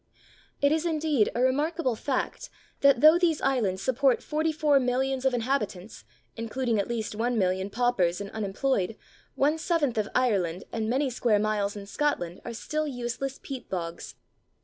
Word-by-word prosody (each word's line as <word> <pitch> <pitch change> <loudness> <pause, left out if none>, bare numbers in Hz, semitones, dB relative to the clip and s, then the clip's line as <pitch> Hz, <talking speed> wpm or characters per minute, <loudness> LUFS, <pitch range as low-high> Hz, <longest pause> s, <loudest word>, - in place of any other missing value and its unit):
] - - -32
It 285 - +5
is 315 +1 +1
indeed 310 -8 +1
a 240 - 0
remarkable 285 0 +1
fact 260 +4 -3 0.3
that 280 -3 +4
though 315 +3 +8
these 335 -4 +2
islands 210 -8 0
support 260 +1 +2
44,000,000 275 -4 +1
of 265 - +4
inhabitants, 225 - -3 0.3
including 230 0 -1
at 200 - -1
least 225 -3 -3
1,000,000 200 -5 0
paupers 205 -8 +1
and 200 -1 -6
unemployed, 215 0 -1 0.4
one 300 +4 +2
seventh 305 -9 0
of 210 - -1
Ireland 195 -8 +1
and 220 -1 -2
many 265 +2 +1
square 235 -3 +2
miles 205 -1 0
in 200 -1 -7
Scotland 200 -7 -2
are 235 - -6
still 305 +6 -2
useless 255 +1 -4
peat 265 -3 -7
bogs! 170 -2 -5
245 Hz, 150 wpm, -27 LUFS, 210-280 Hz, 0.4 s, though